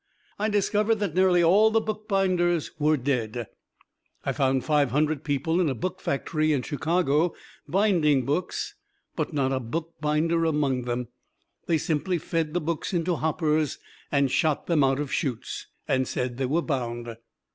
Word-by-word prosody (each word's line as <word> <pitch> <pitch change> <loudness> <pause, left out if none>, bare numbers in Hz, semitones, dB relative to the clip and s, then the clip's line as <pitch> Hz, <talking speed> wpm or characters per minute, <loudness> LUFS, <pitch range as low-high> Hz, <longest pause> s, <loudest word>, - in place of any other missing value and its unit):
I 215 +1 +1
discovered 210 +1 +2
that 205 -6 -2
nearly 180 -1 +4
all 200 +6 +6
the 225 +1 +3
bookbinders 195 -6 0
were 155 +1 +3
dead. 120 -3 -1 0.8
I - - +1
found 135 -2 +1
five 150 -3 +3
hundred 150 +2 0
people 160 +4 0
in 165 - +2
a 130 - -2
book 185 +10 -4
factory 155 +2 0
in 135 -3 0
Chicago 160 +2 +1 0.3
binding 170 -9 +3
books, 165 +6 -2 0.4
but - - -2
not 135 -2 0
a 130 - 0
bookbinder 160 +4 -1
among 145 -6 +1
them. 120 -1 -3 0.6
They 165 - +3
simply 165 +4 0
fed 165 0 -2
the - - +3
books 165 +3 -2
into 170 0 0
hoppers 155 -1 0 0.3
and 140 -2 +2
shot 155 -3 +1
them 160 -5 +3
out 135 0 +2
of 145 -2 -3
chutes, 130 -7 -3 0.2
and 130 -1 +1
said 125 -1 -3
they 130 -1 0
were 165 +6 +1
bound. 120 -4 -3
155 Hz, 155 wpm, -26 LUFS, 135-175 Hz, 0.8 s, all